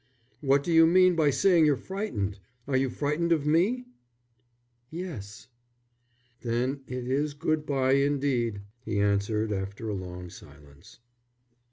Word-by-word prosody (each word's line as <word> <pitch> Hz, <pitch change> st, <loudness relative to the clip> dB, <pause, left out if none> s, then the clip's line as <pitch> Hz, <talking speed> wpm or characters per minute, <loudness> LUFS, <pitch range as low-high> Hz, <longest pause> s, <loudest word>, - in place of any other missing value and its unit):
"What 140 Hz, -1 st, +2 dB
do 170 Hz, -, -1 dB
you 165 Hz, 0 st, +7 dB
mean 185 Hz, +1 st, +5 dB
by 155 Hz, -3 st, +3 dB
saying 165 Hz, +2 st, +4 dB
you're 145 Hz, -, +4 dB
frightened? 115 Hz, -, -4 dB, 0.3 s
Are 140 Hz, -, -1 dB
you 130 Hz, 0 st, +2 dB
frightened 150 Hz, +6 st, -1 dB
of 155 Hz, -4 st, +2 dB
me?" 190 Hz, +12 st, +2 dB, 1.0 s
"Yes." 115 Hz, -, -7 dB, 0.9 s
"Then 125 Hz, +4 st, -1 dB
it 125 Hz, -1 st, -5 dB
is 145 Hz, +3 st, -1 dB
good 155 Hz, +1 st, -1 dB
bye 135 Hz, -2 st, +2 dB
indeed," 135 Hz, -6 st, 0 dB, 0.2 s
he 110 Hz, -2 st, -2 dB
answered, 105 Hz, +2 st, 0 dB
after 100 Hz, +3 st, -4 dB
a -, -, -2 dB
long 90 Hz, -2 st, -7 dB
silence. 70 Hz, -2 st, -16 dB
135 Hz, 135 wpm, -27 LUFS, 105-155 Hz, 1.0 s, you